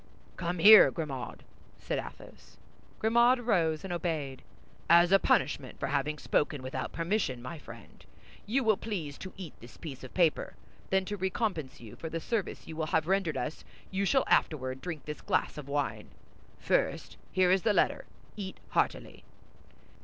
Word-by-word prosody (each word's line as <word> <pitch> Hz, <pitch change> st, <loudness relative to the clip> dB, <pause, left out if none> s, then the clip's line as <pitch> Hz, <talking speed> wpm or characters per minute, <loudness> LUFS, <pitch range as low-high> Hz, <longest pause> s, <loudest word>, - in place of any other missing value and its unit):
"Come 175 Hz, 0 st, -3 dB
here, 210 Hz, +5 st, +9 dB
Grimaud," 135 Hz, -7 st, -5 dB, 0.3 s
said -, -, -3 dB
Athos. -, -, -11 dB, 0.4 s
Grimaud 235 Hz, +3 st, +4 dB
rose 165 Hz, -9 st, +1 dB
and 190 Hz, -2 st, -4 dB
obeyed. 155 Hz, -6 st, -3 dB, 0.5 s
"As 170 Hz, +1 st, +6 dB
a 195 Hz, -, +7 dB
punishment -, -, 0 dB
for -, -, -1 dB
having 150 Hz, 0 st, 0 dB
spoken 145 Hz, -2 st, 0 dB
without 130 Hz, 0 st, -4 dB
permission, 165 Hz, -, -1 dB
my 125 Hz, +7 st, -7 dB
friend, -, -, -13 dB, 0.4 s
you 260 Hz, +5 st, +1 dB
will 220 Hz, -3 st, +3 dB
please 170 Hz, -11 st, -5 dB
to 185 Hz, -, -7 dB
eat 180 Hz, -6 st, -8 dB
this 120 Hz, -, -14 dB
piece 135 Hz, -5 st, -8 dB
of 130 Hz, -, -11 dB
paper; 170 Hz, -4 st, +1 dB, 0.3 s
then 190 Hz, 0 st, +2 dB
to 205 Hz, +2 st, -4 dB
recompense 190 Hz, -, -2 dB
you 115 Hz, -3 st, -11 dB
for 160 Hz, -, -6 dB
the 165 Hz, -, -3 dB
service 210 Hz, +4 st, -3 dB
you 160 Hz, -, -7 dB
will 160 Hz, -1 st, -2 dB
have 160 Hz, 0 st, +1 dB
rendered 190 Hz, -4 st, +1 dB
us, 155 Hz, -, -4 dB, 0.3 s
you 195 Hz, +1 st, 0 dB
shall 270 Hz, +6 st, +3 dB
afterward 130 Hz, -3 st, +1 dB
drink 160 Hz, -6 st, -6 dB
this 150 Hz, -2 st, -6 dB
glass -, -, 0 dB
of 150 Hz, -3 st, -8 dB
wine. 145 Hz, 0 st, -2 dB, 0.5 s
First, -, -, -1 dB
here 185 Hz, -1 st, +3 dB
is 190 Hz, 0 st, +4 dB
the 215 Hz, -, +2 dB
letter. 205 Hz, -, +1 dB, 0.3 s
Eat 195 Hz, -3 st, -6 dB
heartily." -, -, -1 dB
170 Hz, 165 wpm, -30 LUFS, 150-195 Hz, 0.5 s, here